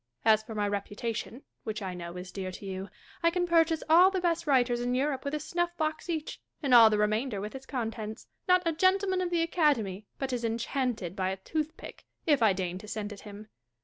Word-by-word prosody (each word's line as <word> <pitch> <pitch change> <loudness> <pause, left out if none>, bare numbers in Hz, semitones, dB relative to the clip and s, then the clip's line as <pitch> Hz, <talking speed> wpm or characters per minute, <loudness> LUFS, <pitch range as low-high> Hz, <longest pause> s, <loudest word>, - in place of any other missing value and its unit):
As 220 -1 +6
for 220 0 -9
my 205 -1 0
reputation, 220 +5 -4 0.2
which 215 -1 -4
I 185 -1 -3
know 175 0 -7
is 180 0 -7
dear 190 -2 -4
to 200 - -9
you, 190 0 -5 0.3
I 335 - +5
can 355 +1 0
purchase 330 -2 +3
all 345 +4 +7
the 385 -1 -1
best 335 -2 0
writers 245 -3 +3
in 245 +1 0
Europe 270 0 0
with 280 +1 -2
a - - +1
snufi" 345 +3 -2
box 310 +2 -2
each, 315 -2 -3 0.2
and 270 -3 +2
all 230 -2 +10
the 210 - +1
remainder 215 +2 0
with 210 +2 -5
its 265 0 -9
contents. 225 -3 -4 0.2
Not 365 0 +5
a 335 - +3
gentleman 375 +2 +2
of 360 - -1
the 340 -1 +1
Academy 235 - +1
but 270 -1 -3
is 240 -1 -2
enchanted 230 -4 -2
by 190 -2 0
a 190 - -3
toothpick, 310 - -5 0.2
if 290 -5 +3
I 220 -3 +6
deign 185 -1 -3
to 210 - -11
send 210 -1 -4
it 200 - -11
him. 210 +1 -10
240 Hz, 220 wpm, -29 LUFS, 210-320 Hz, 0.3 s, all